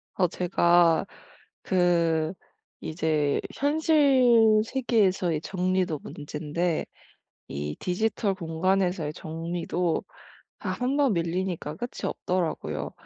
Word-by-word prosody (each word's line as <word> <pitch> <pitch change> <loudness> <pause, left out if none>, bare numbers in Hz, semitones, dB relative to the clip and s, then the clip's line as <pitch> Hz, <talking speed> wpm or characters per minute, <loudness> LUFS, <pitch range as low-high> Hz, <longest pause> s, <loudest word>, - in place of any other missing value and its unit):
어 180 -2 +3
제가 175 -1 +3 0.6
그 170 -3 +2 0.5
이제 155 -3 0 0.2
현실 270 -7 +4
세계에서의 200 - +1
정리도 185 -3 -1
문젠데 155 +3 -3 0.6
이 75 +1 -4
디지털 200 +2 0
공간에서의 180 -1 0
정리도 165 +2 -2 0.6
아 - - -4
1 255 +3 -1
번 280 -5 +3
밀리니까 170 -2 -2
끝이 240 +5 -6
없더라고요. 80 - -2
180 Hz, 200 characters per minute, -26 LUFS, 160-205 Hz, 0.6 s, 현실